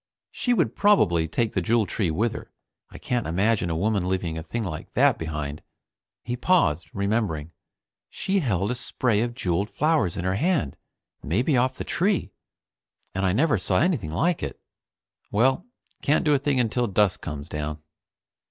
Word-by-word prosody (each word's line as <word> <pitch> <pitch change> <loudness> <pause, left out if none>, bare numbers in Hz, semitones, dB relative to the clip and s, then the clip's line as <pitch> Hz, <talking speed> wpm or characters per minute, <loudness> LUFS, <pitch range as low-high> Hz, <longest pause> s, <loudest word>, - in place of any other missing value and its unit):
She 245 - -1
would 135 - +1
probably 85 - +3
take 115 +7 -1
the 95 - 0
Jewel 110 +5 +2
Tree 100 -2 -1
with 110 +9 0
her. - - -9 0.4
I - - -11
can't 125 -2 -2
imagine 95 +2 +1
a 80 - -1
woman 95 +1 0
leaving 90 -3 -1
a 80 - -4
thing 110 +9 -4
like 80 -5 -6
that - - +3
behind. 75 -2 -4 0.6
He 120 - -3
paused, 95 - +2
remembering. 100 -7 -1 0.6
She 195 +1 -1
held 105 - 0
a - - +1
spray 125 -3 0
of 120 0 -2
jeweled 100 -3 -1
flowers 150 - +1
in 85 - -3
her 95 +1 +1
hand, 160 - +1 0.5
maybe 120 - +1
off 130 +1 +2
the - - -5
Tree, 180 - 0 0.8
and 95 0 0
I 90 - +2
never 130 - +2
saw 90 0 +1
anything 150 - +1
like 165 - +1
it. - - -5 0.7
Well, 130 - +2 0.3
can't 150 +4 +2
do 150 - +4
a 140 - +3
thing 140 -1 +1
until 120 +1 +1
dusk 100 -1 +2
comes 75 -2 -6
down. 75 -1 -4
105 Hz, 170 wpm, -25 LUFS, 85-130 Hz, 0.8 s, do